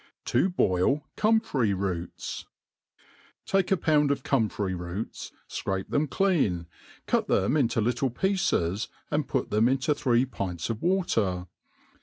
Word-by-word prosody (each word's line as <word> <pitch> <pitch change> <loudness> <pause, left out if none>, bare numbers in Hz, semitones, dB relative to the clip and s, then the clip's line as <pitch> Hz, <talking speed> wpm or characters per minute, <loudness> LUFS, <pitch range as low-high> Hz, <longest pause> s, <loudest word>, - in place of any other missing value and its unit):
i - - -29
* - - -35
" - - -57
To 190 - +3
boil 135 - +2
Comfrey 210 - +2
'Roots 90 -3 -4 1.0
t - - -11
TAKE 195 -1 +2
a - - +2
pound 150 -3 +3
of 140 -2 0
comfrey 110 -8 0
roots, 90 +4 -5 0.2
fcrape 95 -1 -3
(hem 150 +1 +2
clean, 145 - +1 0.4
cuf - - +1
them 100 +9 +2
into 125 -6 +2
little 120 +4 +1
pieces, 125 - 0 0.2
and 150 -1 0
put 130 - -1
them 110 +3 +4
into 135 +3 +2
three 125 -3 +2
pints 100 -6 -4
of 110 - -5
water. 115 - +1
125 Hz, 150 wpm, -27 LUFS, 95-150 Hz, 1.0 s, them